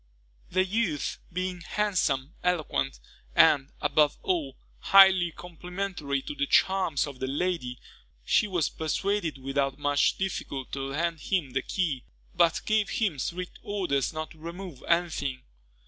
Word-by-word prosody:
The 185 Hz, +1 st, +2 dB
youth, 190 Hz, -7 st, -1 dB
being 185 Hz, 0 st, -3 dB
handsome, 170 Hz, -8 st, 0 dB
eloquent, 175 Hz, -, 0 dB, 0.4 s
and, 140 Hz, -1 st, +5 dB
above 145 Hz, 0 st, +3 dB
all, 155 Hz, -8 st, -1 dB, 0.2 s
highly 190 Hz, -3 st, +7 dB
complimentary 175 Hz, -4 st, -4 dB
to -, -, -5 dB
the 140 Hz, -1 st, -1 dB
charms 190 Hz, -7 st, +3 dB
of 140 Hz, -3 st, -9 dB
the 130 Hz, -, -2 dB
lady, 140 Hz, -4 st, -1 dB, 0.5 s
she -, -, +3 dB
was 180 Hz, -5 st, +1 dB
persuaded 170 Hz, 0 st, -1 dB
without 135 Hz, 0 st, -1 dB
much 145 Hz, -1 st, +2 dB
difficulty 140 Hz, -8 st, -4 dB
to 135 Hz, -, -3 dB
lend 165 Hz, +4 st, -1 dB
him 170 Hz, -6 st, -1 dB
the 135 Hz, -, 0 dB
key, 150 Hz, -5 st, -2 dB, 0.3 s
but 170 Hz, -2 st, +3 dB
gave 215 Hz, -1 st, +2 dB
him 195 Hz, -11 st, 0 dB
strict 180 Hz, +7 st, -4 dB
orders 180 Hz, -10 st, -1 dB
not 155 Hz, 0 st, -5 dB
to 160 Hz, -, -15 dB
remove 170 Hz, -3 st, -8 dB
any 170 Hz, +1 st, +3 dB
thing. 130 Hz, -4 st, -4 dB
165 Hz, 140 wpm, -28 LUFS, 140-185 Hz, 0.5 s, highly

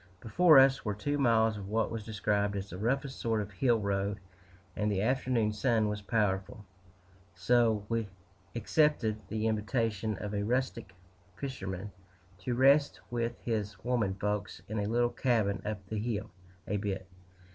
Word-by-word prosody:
Before 155 Hz, -, +5 dB
us 135 Hz, 0 st, +6 dB
were 105 Hz, -2 st, -2 dB
two 145 Hz, +7 st, -2 dB
miles 115 Hz, -4 st, +3 dB
of 95 Hz, -, -7 dB
what 110 Hz, +1 st, 0 dB
was 115 Hz, -2 st, -4 dB
described 105 Hz, -1 st, 0 dB
as 100 Hz, 0 st, -5 dB
the 90 Hz, -, -6 dB
roughest 135 Hz, +5 st, -1 dB
sort 115 Hz, -1 st, 0 dB
of 105 Hz, 0 st, -4 dB
hill 120 Hz, +3 st, +2 dB
road, 100 Hz, 0 st, -1 dB, 0.6 s
and 105 Hz, 0 st, 0 dB
the 100 Hz, -, 0 dB
afternoon 125 Hz, -3 st, +1 dB
sun 110 Hz, -1 st, +2 dB
was 105 Hz, 0 st, -3 dB
powerful; 105 Hz, +1 st, -1 dB, 0.7 s
so 110 Hz, +3 st, +3 dB
W 115 Hz, -1 st, -1 dB, 0.5 s
accepted 115 Hz, -3 st, +1 dB
the 110 Hz, +1 st, -2 dB
invitation 110 Hz, -1 st, 0 dB
of 105 Hz, +1 st, -5 dB
a 100 Hz, -, -1 dB
rustic 115 Hz, -3 st, -2 dB, 0.4 s
fisherman 100 Hz, -7 st, -5 dB, 0.5 s
to 120 Hz, +5 st, -2 dB
rest 140 Hz, +3 st, +4 dB
with 120 Hz, 0 st, -2 dB
his 110 Hz, -3 st, -1 dB
"women 115 Hz, -6 st, 0 dB
folks" 105 Hz, +1 st, -3 dB
in 110 Hz, +1 st, -3 dB
a 100 Hz, -, -1 dB
little 120 Hz, +1 st, +2 dB
cabin 110 Hz, -6 st, +1 dB
up 105 Hz, -2 st, -4 dB
the 105 Hz, +2 st, -3 dB
hill 110 Hz, -2 st, -3 dB, 0.4 s
a 105 Hz, -, 0 dB
bit. 95 Hz, -2 st, -3 dB
110 Hz, 155 wpm, -31 LUFS, 100-120 Hz, 0.7 s, us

